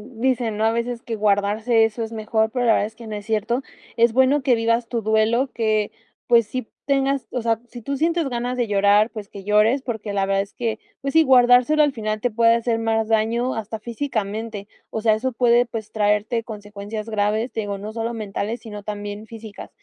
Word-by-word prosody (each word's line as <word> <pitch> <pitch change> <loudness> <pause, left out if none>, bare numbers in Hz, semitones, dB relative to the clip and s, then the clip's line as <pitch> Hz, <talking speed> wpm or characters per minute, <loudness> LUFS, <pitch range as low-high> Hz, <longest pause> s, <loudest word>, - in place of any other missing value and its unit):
dicen, 240 -2 0
¿no?, 215 - +1
a 225 - +4
veces 235 +1 -3
que 230 - -4
guardarse 215 +2 +2
eso 225 +1 -4
es 225 - -6
mejor, 220 0 0
pero 250 0 -1
la 230 - +5
verdad 205 - +1
es 220 - -15
que 230 +1 -11
no 215 - -5
es 205 -1 -7
cierto. 225 +3 0 0.4
Es 235 0 +4
bueno, 260 +3 +4
que 260 -2 +3
vivas 230 +1 +1
tu 235 -2 -1
duelo 220 +4 +2
que, 215 -2 0 0.3
pues, 230 -2 +4
sí 255 +1 -4 0.2
tengas, 275 -1 +1
o 250 - -2
sea, 225 -1 +1
si 240 0 -10
tú 275 +4 -3
sientes 330 +1 +1
ganas 245 0 -3
de 245 - +1
llorar, 205 +1 +4
pues, 210 -3 -8
que 200 - -10
llores, 210 +6 +3
porque 220 -4 -4
la 195 -1 +1
verdad 195 0 +1
es 200 - -8
que, 225 -2 -3 0.2
pues 275 0 -3
sí, 320 - +7
guardárselo 250 +2 +5
al 295 - +2
final 215 -2 -3
te 245 - 0
puede 230 +1 +4
hacer 230 -1 0
más 225 -1 0
daño 230 +3 +1
hasta 220 0 -4
físicamente. 220 -3 -4 0.2
O 220 - -4
sea, 220 0 +4
eso 250 +5 -1
puede, 240 0 +4
pues, 220 -2 -6
traerte 210 +2 +1
consecuencias 210 0 -7
graves. 215 +3 0
Te - - -4
digo, 205 -1 -4
no 210 +2 -7
solo 230 +1 -3
mentales, 215 +1 -4
sino 210 -3 -8
también 205 +1 -6
físicas. 220 -2 -10
225 Hz, 215 wpm, -22 LUFS, 215-240 Hz, 0.4 s, sí